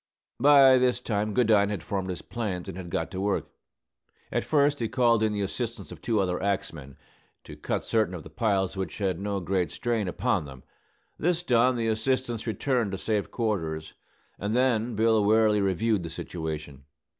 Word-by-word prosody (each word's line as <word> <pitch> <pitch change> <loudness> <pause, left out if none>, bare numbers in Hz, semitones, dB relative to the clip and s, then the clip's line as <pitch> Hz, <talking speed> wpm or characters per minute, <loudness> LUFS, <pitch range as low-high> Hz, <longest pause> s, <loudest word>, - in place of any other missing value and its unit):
By 135 -1 +7
this 125 -1 +2
time 105 -3 -1
Goodine 110 -5 +4
had 100 -5 -4
formed 95 -2 -3
his 90 - -5
plans, 100 -7 -4
and 95 - -6
had 90 -2 -7
got 80 - -2
to 95 0 -4
work. 100 0 -1 0.8
At - - 0
first 145 -1 +2
he 115 - 0
called 120 -3 +3
in 110 -1 +2
the 105 -1 -1
assistance 115 +4 -4
of - - -10
two 115 -3 0
other 90 -2 0
axemen, 80 -8 -3 0.5
to - - -10
cut - - -3
certain 110 -5 0
of 80 - -8
the 80 - -12
piles 95 0 0
which 95 -1 -4
had 95 -4 -1
no 100 0 -2
great 90 -2 -1
strain 115 - -2
upon 105 -2 0
them. 65 -2 -11 0.6
This 175 +1 0
done, 125 -3 +3
the 115 -1 -1
assistants 120 +1 -1
returned 115 -1 0
to - - -2
safe 105 0 -1
quarters; 80 -9 -2 0.5
and 105 +3 -2
then 120 -2 +1
Bill 110 0 +3
warily 105 0 +4
reviewed 100 +2 +1
the 85 - -6
situation. 75 -4 -6
105 Hz, 180 wpm, -27 LUFS, 95-120 Hz, 0.8 s, By